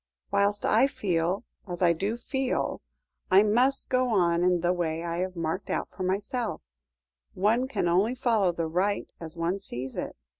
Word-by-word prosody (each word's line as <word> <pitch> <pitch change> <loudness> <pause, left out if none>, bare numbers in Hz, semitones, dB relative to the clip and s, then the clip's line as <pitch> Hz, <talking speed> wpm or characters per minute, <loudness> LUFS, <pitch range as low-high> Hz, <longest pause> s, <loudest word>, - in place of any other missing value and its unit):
Whilst 200 +1 +1
I 225 +5 +4
feel 180 -6 -1 0.2
as 180 0 -3
I 170 -1 +5
do 200 +7 -2
feel 265 +1 -2 0.5
I 190 +2 +7
must 250 +6 +2
go 255 0 +3
on 175 -6 +2
in 180 -1 +3
the 175 +1 +2
way 165 -2 -2
I 170 0 -3
have 185 +1 -2
marked 165 +3 -3
out - - -2
for - - -10
myself, 200 - -2 0.7
one 225 +7 +2
can 205 -9 -1
only 195 +8 +2
follow 225 -7 +2
the 170 -1 -2
right 190 +5 -1
as 165 0 -8
one 170 +4 -1
sees 130 -8 -5
it. - - -4
190 Hz, 175 wpm, -27 LUFS, 170-220 Hz, 0.7 s, I